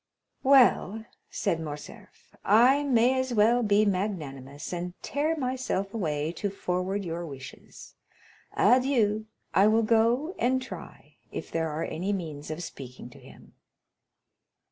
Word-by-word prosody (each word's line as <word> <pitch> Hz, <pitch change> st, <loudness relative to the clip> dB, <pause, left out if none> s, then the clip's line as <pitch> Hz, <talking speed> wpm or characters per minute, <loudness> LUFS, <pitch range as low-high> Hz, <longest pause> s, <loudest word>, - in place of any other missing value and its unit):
"Well," 245 Hz, -5 st, +4 dB, 0.2 s
said 185 Hz, -6 st, -1 dB
Morcerf, 150 Hz, -2 st, -10 dB
"I 245 Hz, +7 st, +5 dB
may 260 Hz, -2 st, +3 dB
as 260 Hz, -2 st, -2 dB
well 225 Hz, +3 st, +4 dB
be 210 Hz, -1 st, +3 dB
magnanimous, 150 Hz, -9 st, -3 dB
and 175 Hz, 0 st, -4 dB
tear 300 Hz, +4 st, 0 dB
myself 250 Hz, -7 st, -2 dB
away 155 Hz, -7 st, -1 dB
to 205 Hz, -, -1 dB
forward 190 Hz, +1 st, -2 dB
your 170 Hz, 0 st, -4 dB
wishes. 135 Hz, -5 st, -11 dB, 0.6 s
Adieu; 225 Hz, -3 st, +3 dB, 0.3 s
I 195 Hz, +2 st, +5 dB
will 220 Hz, +1 st, +3 dB
go 235 Hz, -, +2 dB
and 255 Hz, +2 st, +2 dB
try 260 Hz, -, -10 dB
if -, -, -6 dB
there 165 Hz, -1 st, -1 dB
are 155 Hz, +2 st, -3 dB
any 190 Hz, +5 st, -2 dB
means 155 Hz, -6 st, -5 dB
of 155 Hz, +3 st, -5 dB
speaking 125 Hz, -4 st, -9 dB
to -, -, -15 dB
him." -, -, -16 dB
205 Hz, 130 wpm, -27 LUFS, 165-245 Hz, 0.6 s, I